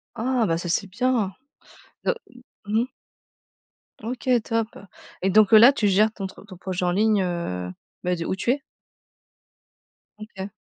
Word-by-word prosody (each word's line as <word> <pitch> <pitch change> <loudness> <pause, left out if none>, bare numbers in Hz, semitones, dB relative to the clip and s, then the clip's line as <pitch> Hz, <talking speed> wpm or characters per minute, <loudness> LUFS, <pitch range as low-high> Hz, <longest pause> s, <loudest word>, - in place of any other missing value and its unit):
Oh, 240 0 +1
bah 165 -1 0
ça 175 - -5
c'est 195 +4 +1
bien! 225 -1 0 0.7
Donc, 480 - +1
m 245 0 -17 0.2
mmh 220 +2 +2
mh. - - 0 1.2
OK, 245 +4 -6 0.2
top! 225 -1 0 0.5
Et 190 - +1
donc 210 +1 +5
là, 230 +5 +9
tu 220 -7 0
gères 210 +3 +4
ton 205 -3 -6
truc 190 +2 -10
ton 185 -3 -11
projet 185 0 -4
en 175 - +2
ligne, 210 +1 +3
heu, 130 - -3 0.3
bah, 180 0 +1
d'où 165 +2 -2
tu 215 - -3
es? 280 +2 -1 1.6
OK. 205 -2 -8
210 Hz, 160 wpm, -24 LUFS, 185-230 Hz, 1.6 s, là